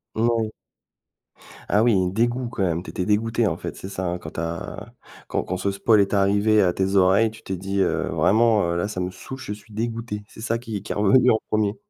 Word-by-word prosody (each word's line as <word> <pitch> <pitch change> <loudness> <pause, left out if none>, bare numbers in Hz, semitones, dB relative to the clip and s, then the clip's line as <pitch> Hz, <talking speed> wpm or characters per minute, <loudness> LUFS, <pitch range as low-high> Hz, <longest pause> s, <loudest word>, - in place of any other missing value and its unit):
Moui. 115 -1 +1 1.2
Ah 105 - +3
oui, 95 -6 +3
dégoût 120 +4 0
quand 115 -3 -5
même 85 -1 0
tu - - -8
étais 90 - -3
dégoûté 115 +2 +1
en - - -1
fait, - - -6
c'est 95 - -8
ça 95 -1 -4
hein? 90 0 -1
Quand 80 - -8
tu - - -5
as 85 0 -5 0.3
quand - - -1
quand 95 - -3
ce 100 +2 -1
spoil 105 +2 +3
est 100 - 0
arrivé 100 +2 +3
à 90 -3 +2
tes 95 +1 0
oreilles, 95 +4 +4
tu 110 - -14
t'es 95 - -4
dit: 95 +2 -3
«Heu, - - 0
vraiment, 110 0 +3
heu, - - -1
là 85 - 0
ça 105 -3 -5
me 90 0 -1
soûle, 130 +8 -9
je 105 - -5
suis 105 +1 -14
dégoûté», 115 -1 -4
c'est 110 - -13
ça 115 +1 -1
qui 110 -5 -6
qui - - -6
est - - -2
revenu 115 +5 +5
en 110 - +2
1er? 105 -1 +1
105 Hz, 235 wpm, -23 LUFS, 95-115 Hz, 1.2 s, revenu